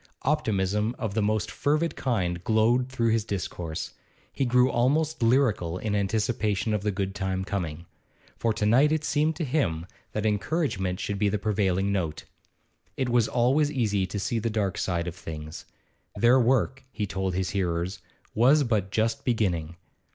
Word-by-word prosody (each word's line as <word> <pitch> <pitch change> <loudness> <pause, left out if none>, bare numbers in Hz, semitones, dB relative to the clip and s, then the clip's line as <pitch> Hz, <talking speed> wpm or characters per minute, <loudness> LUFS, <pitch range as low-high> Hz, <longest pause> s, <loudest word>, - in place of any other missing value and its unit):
Optimism 110 -6 0
of 110 -4 -3
the 110 - +1
most 105 +1 0
fervid 155 +3 0
kind 90 -9 -1
glowed 115 +4 +2
through 115 -3 0
his 110 -1 +2
discourse; 90 -5 -4 0.4
he 135 - 0
grew 125 +1 +4
almost 145 +6 +1
lyrical 115 -8 +2
in 105 +2 -3
his 105 - +2
anticipation 105 0 0
of 105 - 0
the 105 - 0
good 95 -1 -2
time 95 0 -2
coming. 85 -5 -4 0.5
For 115 - 0
to 105 - -1
night 130 +8 +5
it 155 -1 0
seemed 155 +1 +1
to 170 - -3
him 120 - 0 0.3
that 105 0 -2
encouragement 105 - 0
should 100 -1 -3
be 105 0 +3
the 105 - 0
prevailing 100 -2 0
note; 85 -6 -2 0.7
it 130 -2 0
was 120 -2 +3
always 135 +5 +2
easy 105 -8 0
to 100 - -5
see 115 +4 -1
the 115 +1 -1
dark 105 -4 -1
side 85 -2 -1
of 85 - -3
things. 80 -2 -8 0.5
Their 120 +3 +5
work, 130 +1 +1
he 105 - -2
told 95 -2 -2
his 95 -2 -1
hearers, 90 0 -1 0.3
was 135 +7 +5
but 110 -6 0
just 115 +2 0
beginning. 90 -9 0
105 Hz, 170 wpm, -27 LUFS, 95-125 Hz, 0.7 s, night